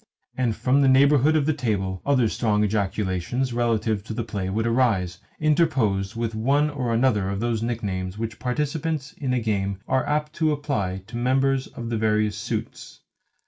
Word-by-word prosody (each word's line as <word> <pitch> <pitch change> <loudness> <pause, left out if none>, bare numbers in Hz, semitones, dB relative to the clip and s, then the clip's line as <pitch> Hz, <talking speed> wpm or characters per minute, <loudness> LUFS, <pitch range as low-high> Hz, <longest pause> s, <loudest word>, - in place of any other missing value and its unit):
And 120 -4 0
from 135 +2 +2
the 135 - +4
neighbourhood 140 +3 +5
of 150 -3 +2
the 155 - +2
table 100 -9 -2
other 130 -5 +3
strong 105 -1 +1
ejaculations 105 +4 -1
relative 110 -3 0
to 110 - -5
the 115 - -2
play 100 -4 -4
would 110 +4 -1
arise, 110 -7 +1 0.2
interposed 130 - +1
with 115 -1 -2
one 140 +7 +2
or 130 -5 -2
another 115 -5 +2
of 100 0 -2
those 115 -1 -1
nicknames 100 -5 -3
which 115 0 -4
participants 150 +2 -2
in 135 -3 -3
a 125 - +2
game 100 -3 -1
are 130 - +1
apt 150 +1 -1
to 155 -2 +2
apply 105 -11 -2
to 115 +3 -7
members 130 +2 +1
of 115 -1 -7
the 115 - 0
various 105 -1 +1
suits. - - -5
115 Hz, 175 wpm, -24 LUFS, 105-135 Hz, 0.2 s, neighbourhood